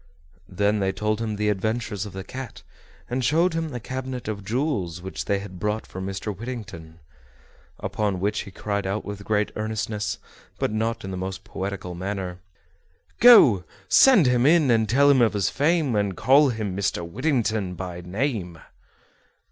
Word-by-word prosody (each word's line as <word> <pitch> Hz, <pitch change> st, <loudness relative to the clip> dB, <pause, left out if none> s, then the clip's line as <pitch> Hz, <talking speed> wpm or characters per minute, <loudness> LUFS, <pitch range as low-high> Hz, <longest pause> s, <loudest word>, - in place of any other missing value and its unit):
Then 100 Hz, +3 st, +1 dB
they 95 Hz, -1 st, +1 dB
told 105 Hz, +3 st, -1 dB
him 110 Hz, -2 st, -2 dB
the 105 Hz, 0 st, 0 dB
adventures 105 Hz, 0 st, -2 dB
of 100 Hz, -, -11 dB
the 95 Hz, 0 st, -6 dB
cat, 130 Hz, +2 st, -8 dB, 0.4 s
and 125 Hz, +1 st, -2 dB
showed 165 Hz, +7 st, +3 dB
him 165 Hz, -1 st, -2 dB
the 125 Hz, -4 st, -5 dB
cabinet 130 Hz, 0 st, -5 dB
of 105 Hz, -2 st, -4 dB
jewels 105 Hz, -, -2 dB
which 95 Hz, +2 st, -6 dB
they 100 Hz, -, +1 dB
had 100 Hz, -2 st, -8 dB
brought 105 Hz, +2 st, -2 dB
for 95 Hz, -, -8 dB
Mr. 95 Hz, +2 st, -4 dB
Whittington. 100 Hz, -9 st, -8 dB, 0.8 s
Upon 100 Hz, -3 st, -2 dB
which 105 Hz, +3 st, 0 dB
he 100 Hz, -, -6 dB
cried 100 Hz, 0 st, -3 dB
out 100 Hz, +3 st, -2 dB
with 100 Hz, 0 st, -6 dB
great 105 Hz, 0 st, 0 dB
earnestness, 110 Hz, -1 st, -3 dB, 0.4 s
but -, -, -1 dB
not 115 Hz, +1 st, -2 dB
in 95 Hz, -, -5 dB
the 95 Hz, -, -4 dB
most 95 Hz, +1 st, -5 dB
poetical 95 Hz, -2 st, -5 dB
manner: 95 Hz, 0 st, -4 dB, 0.8 s
"Go, 175 Hz, -, +8 dB, 0.2 s
send 250 Hz, -, +6 dB
him 125 Hz, +1 st, +3 dB
in, 155 Hz, -5 st, +5 dB
and 110 Hz, -2 st, +2 dB
tell 140 Hz, +5 st, +4 dB
him 140 Hz, -3 st, +5 dB
of 115 Hz, -2 st, +3 dB
his 95 Hz, -2 st, 0 dB
fame, 150 Hz, -, +1 dB
And 100 Hz, -2 st, 0 dB
call 140 Hz, +2 st, +5 dB
him 110 Hz, -5 st, -3 dB
Mr. 95 Hz, -3 st, -1 dB
Whittington 110 Hz, -, -1 dB
by 90 Hz, -1 st, -6 dB
name." 95 Hz, -, -3 dB
105 Hz, 170 wpm, -24 LUFS, 95-125 Hz, 0.8 s, Go